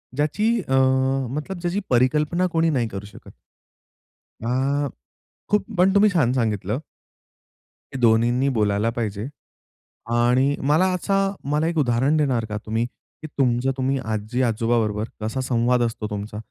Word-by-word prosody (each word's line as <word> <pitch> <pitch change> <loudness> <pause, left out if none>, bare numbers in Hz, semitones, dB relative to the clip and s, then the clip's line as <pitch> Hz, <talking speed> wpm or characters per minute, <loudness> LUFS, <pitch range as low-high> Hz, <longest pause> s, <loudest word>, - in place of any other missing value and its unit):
ज्याची 155 - +1 0.2
अ, - - +1 0.6
मतलब 150 +8 -5
ज्याची, 175 +3 -1
परिकल्पना 150 +8 +2
कोणी 165 0 +3
नाही 125 -7 0
करू 100 -1 -7
शकत. 105 - -14 1.1
आ, 135 +4 0 0.6
खूप 210 - +2
पण 185 +2 +4
तुम्ही 210 +1 +6
छान 130 -8 +2
सांगितलं. 110 -2 -1 1.1
हे - - -3
दोन्हीींनी 120 +3 +3
बोलायला 105 +1 +1
पाहिजे. 110 -3 -3 0.9
आणि 125 +4 +3
मला 160 +5 +4
असा 190 +2 -1 0.3
मला 150 +2 +1
एक 170 0 -2
उदाहरण 135 +2 +2
देणार 130 -7 +1
का 105 - -3
तुम्ही? 110 +2 -1
की 140 +5 -13
तुमचं 130 -3 +1
तुम्ही 135 +1 0
आजी-आजोबा 115 +2 0
बरोबर 105 0 -2
कसा 110 +5 -2
संवाद 125 -1 +1
असतो 115 -2 -3
तुमचा? 105 +1 -5
125 Hz, 135 wpm, -23 LUFS, 115-150 Hz, 1.1 s, तुम्ही